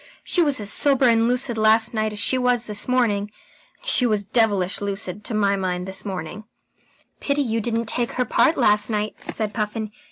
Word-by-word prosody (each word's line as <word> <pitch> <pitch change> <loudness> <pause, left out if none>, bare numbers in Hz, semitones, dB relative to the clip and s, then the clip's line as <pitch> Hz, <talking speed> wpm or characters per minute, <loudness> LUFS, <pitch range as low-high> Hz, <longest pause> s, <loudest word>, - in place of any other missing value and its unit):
She 355 - +2
was 290 -6 +1
as 205 0 -1
sober 275 -2 +3
and 230 -1 +3
lucid 245 -2 0
last 220 +1 +3
night 215 -1 -1
as 210 - -8
she 205 - +3
was 250 -2 +1
this 210 -2 -1
morning. 220 -5 0 0.5
And - - -14
she 250 - +4
was 210 -3 -1
devilish 205 -5 0
lucid, 200 -1 -4
to 225 - -1
my 200 -1 +2
mind, 180 -1 -3
this 190 0 -3
morning." 195 +1 -6 0.7
"Pity 285 0 0
you 225 -2 -2
didn't 230 +1 -2
take 235 +2 -3
her 250 - -1
part 330 +7 +2
last 210 +1 +3
night," 210 -1 -2
said 215 -2 -3
Puffin. 215 -1 -3
220 Hz, 195 wpm, -22 LUFS, 205-245 Hz, 0.7 s, she